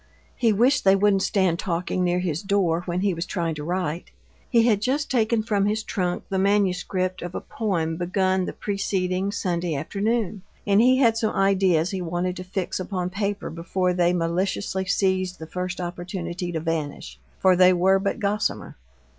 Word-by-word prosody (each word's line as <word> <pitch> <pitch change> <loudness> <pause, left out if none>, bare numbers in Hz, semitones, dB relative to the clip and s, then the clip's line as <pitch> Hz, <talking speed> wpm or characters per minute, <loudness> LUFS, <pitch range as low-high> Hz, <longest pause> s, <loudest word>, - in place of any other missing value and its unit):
He 230 -3 +2
wished 245 +7 +3
they 195 0 +6
wouldn't 195 0 +3
stand 190 -4 +1
talking 180 +1 -1
near 175 0 +1
his 175 -3 -2
door 195 -5 +1
when 175 +1 -1
he 200 -1 +1
was 165 +1 -4
trying 170 -3 -2
to 150 -1 -6
write. 175 0 -3 0.4
He 230 -2 +4
had 215 -4 +3
just 275 +6 -1
taken 230 -2 +2
from 205 -3 +1
his 215 +1 -1
trunk 180 -4 -2
the 190 - -1
manuscript 185 -2 0
of 175 +1 -6
a - - -1
poem 165 -7 -2
begun 185 +1 +1
the - - -5
preceding 195 -1 -1
Sunday 175 -4 -2
afternoon, 205 +6 -1 0.2
and 205 +1 +4
he 255 +2 +5
had 230 -4 +4
some 220 -1 -1
ideas 190 -4 +2
he 190 -2 -3
wanted 175 +1 -2
to 180 - -5
fix 185 0 -3
upon 185 -1 -3
paper 200 +1 -3
before 180 +2 -1
they 175 -1 +2
maliciously 185 +2 -1
seized 185 -1 0
the 160 - -8
first 180 +2 -4
opportunity 175 0 -4
to 165 - -2
vanish, 160 -2 -4 0.2
for 185 -1 +4
they 180 0 +6
were 190 +2 +3
but 195 0 -1
gossamer. 205 - -2
185 Hz, 180 wpm, -24 LUFS, 175-200 Hz, 0.4 s, they